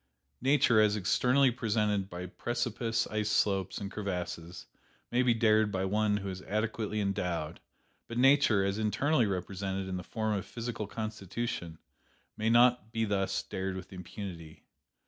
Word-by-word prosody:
Nature 130 -4 +4
as 105 -1 +3
externally 125 +7 +3
presented 105 -4 0
by 90 0 -6
precipice 115 +3 -1
ice 110 -1 0
slopes 95 -3 +1
and 100 -1 -5
crevasses 90 -4 -5 0.5
may 125 - +3
be 125 -1 +4
dared 110 -2 +3
by 95 -1 -1
one 105 +1 +1
who 100 -1 -4
is 95 0 -6
adequately 110 +1 -2
endowed; 90 -5 -2 0.5
but 115 - -6
Nature, 130 -6 +5
as 100 +2 -1
internally 115 +4 +2
represented 95 0 -3
in 95 -1 -3
the 90 - -5
form 110 +2 -2
of 100 -2 -1
physical 115 -3 -5
constitution, 105 -5 -4 0.6
may 110 +1 0
not 120 -1 +4
be 115 -1 0
thus 95 -2 0
dared 95 0 -4
with 95 0 -8
impunity. 90 -3 -8
105 Hz, 145 wpm, -31 LUFS, 95-115 Hz, 0.6 s, Nature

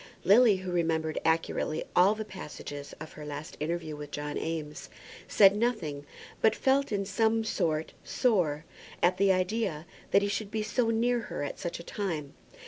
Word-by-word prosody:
Lily, 215 +2 +6
who 185 -1 -5
remembered 160 -2 0
accurately 160 -1 0
all 190 +4 +5
the 220 0 -5
passages 145 -6 -8
of 160 0 -8
her 150 - -9
last 150 +1 -7
interview 160 0 -3
with 150 -1 -8
John 145 0 -4
Eames, 155 -2 -4 0.4
said 200 -1 +6
nothing, 180 -11 -1 0.3
but 220 0 +4
felt, 270 0 +2
in 200 -1 0
some 225 +3 +1
sort, 160 -7 -1
sore 165 - +1 0.4
at 180 +1 +4
the 195 0 +4
idea 185 -3 -1 0.2
that 200 - +4
he - - +1
should 205 0 -2
be 215 0 -2
so 230 +2 0
near 240 +2 +2
her - - -3
at 145 - -5
such 170 - -4
a - - -8
time. 160 -8 -4
180 Hz, 170 wpm, -29 LUFS, 155-215 Hz, 0.4 s, Lily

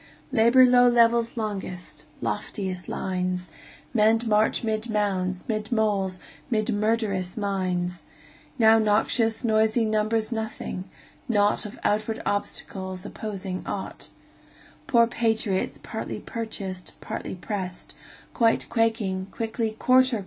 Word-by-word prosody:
Labor 250 +1 +6
low 245 0 +6
levels 235 0 +3
longest, 185 -8 -5 0.2
lofiest 180 - -3
lines; 180 -1 -2 0.4
Men 220 0 +4
march 215 +1 +2
'mid 220 +1 -1
mounds, 190 -4 0
'mid 215 0 -2
moles, 205 -5 +1 0.2
' - - -26
mid 220 -1 +1
murderous 205 -3 0
mines; 180 -4 -1 0.6
Now 225 -2 +6
noxious, 220 +2 +2
noisey 220 0 +3
numbers 215 +1 0
nothing, 220 -4 -4 0.4
naught 205 -1 +3
Of 205 - -11
outward 215 +1 0
obstacles, 190 -2 -3
opposing 195 -3 -5
ought; - - -5 0.8
Poor 235 -2 +5
patriots, 225 -4 0
partly - - -5
purchased, 195 -6 -5
partly - - -5
pressed, 185 -1 -5 0.4
Quite 230 -2 +2
quaking, 225 -5 0
quickly 225 0 -2
"Quarter! 255 -2 +4
215 Hz, 110 wpm, -26 LUFS, 190-225 Hz, 0.8 s, Labor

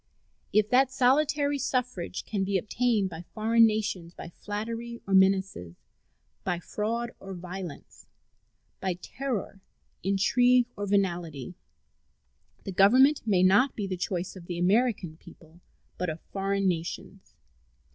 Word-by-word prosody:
If 210 0 +3
that 260 +1 +4
solitary 285 +2 +2
suffrage 250 -9 -2
can 200 -3 -2
be 195 0 +1
obtained 210 0 0
by 160 0 -7
foreign 225 +1 +5
nations 205 -6 -3
by - - -8
flattery 230 +5 -5
or 195 - -3
menaces, 190 - +2 0.7
by 175 - -1
fraud 230 +6 -3
or 195 -1 -8
violence, 180 -2 -9 0.7
by 190 -2 -1
terror, 215 0 -5 0.4
intrigue, 245 +6 +3
or 205 0 -4
venality, 175 -8 -1 1.1
the 195 - -5
Government 255 +10 +5
may 185 -4 +3
not 205 +9 +4
be 205 - -3
the 190 -1 -3
choice 180 +1 -3
of 175 -2 -11
the 175 - -4
American 190 -3 +1
people, 165 0 -17 0.4
but 180 -1 -1
of 160 +1 -5
foreign 195 0 0
nations. 165 - -4
195 Hz, 125 wpm, -28 LUFS, 180-235 Hz, 1.1 s, foreign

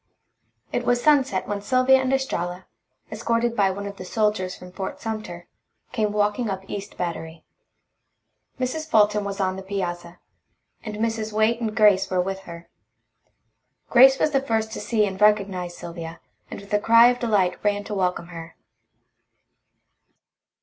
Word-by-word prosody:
It 245 - 0
was 245 0 +2
sunset 270 -8 +2
when 205 -1 -3
Sylvia 255 +5 +4
and 260 0 -1
Estralla, 180 -10 -2 0.5
escorted 230 +1 -1
by 200 -3 +3
one 200 +2 -5
of 200 -1 -7
the - - -7
soldiers 210 -2 -1
from 180 0 -12
Fort 190 +1 -6
Sumter, 215 -6 -6 0.5
came 215 -4 0
walking 210 +2 0
up 190 0 -5
East 200 0 -7
Battery. 165 -2 -5 1.1
Mrs. 310 +5 -3
Fulton 210 -3 +3
was 200 0 -5
on 190 -1 0
the - - -6
piazza, 175 -3 -5 0.7
and 215 -2 -6
Mrs. 220 0 -2
Waite 220 +2 +2
and 220 -2 -3
Grace 205 -3 +4
were 185 - 0
with 190 +1 -2
her. 170 0 -10 1.2
Grace 265 +2 +7
was 305 - +1
the 275 -2 +2
first 220 -4 -1
to - - -5
see 220 -3 +1
and 190 0 -6
recognize 195 -4 +2
Sylvia, 165 -1 -8 0.3
and - - -7
with 200 +1 -11
a 210 - +4
cry 230 +2 +6
of 245 0 -1
delight 200 -6 0
ran 205 -1 0
to 210 - -6
welcome 180 -3 -1
her. 165 -1 -9
205 Hz, 155 wpm, -23 LUFS, 185-230 Hz, 1.2 s, Grace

